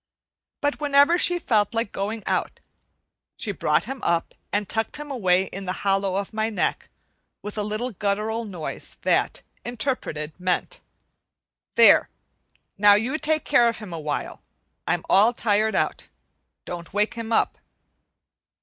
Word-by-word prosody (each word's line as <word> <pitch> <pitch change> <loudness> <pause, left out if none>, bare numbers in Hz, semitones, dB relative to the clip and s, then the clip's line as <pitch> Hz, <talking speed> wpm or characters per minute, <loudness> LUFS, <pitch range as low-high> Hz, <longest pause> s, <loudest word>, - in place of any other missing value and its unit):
But 290 0 0
whenever 290 +4 +4
she 355 -1 +4
felt 220 - +1
like 225 -2 -1
going 210 +2 -3
out - - -1 0.8
she - - -2
brought - - +1
him 270 -1 -6
up 170 0 0 0.2
and 205 0 0
tucked 220 +6 -2
him 295 -1 -7
away 190 -8 +2
in 195 0 -7
the 185 - -2
hollow 195 -1 +1
of 200 +2 -3
my 220 +1 0
neck, 215 - -2 0.5
with 210 - -6
a 215 - -1
little 215 +4 -2
guttural 215 +3 -1
noise 180 -8 -6
that, - - +1 0.2
interpreted, 215 - -3
meant: 180 0 -1 0.9
"There, - - +6 0.7
now 205 0 +7
you 250 +9 0
take 310 0 0
care 240 - +4
of 230 - -4
him 205 -6 -8
awhile. 150 -3 -4 0.5
I'm - - 0
all 215 +5 +5
tired 215 -1 +1
out. - - -1 0.6
Don't 175 +1 -7
wake 210 +1 +1
him 230 -1 -6
up." - - +1
215 Hz, 145 wpm, -24 LUFS, 195-240 Hz, 0.9 s, now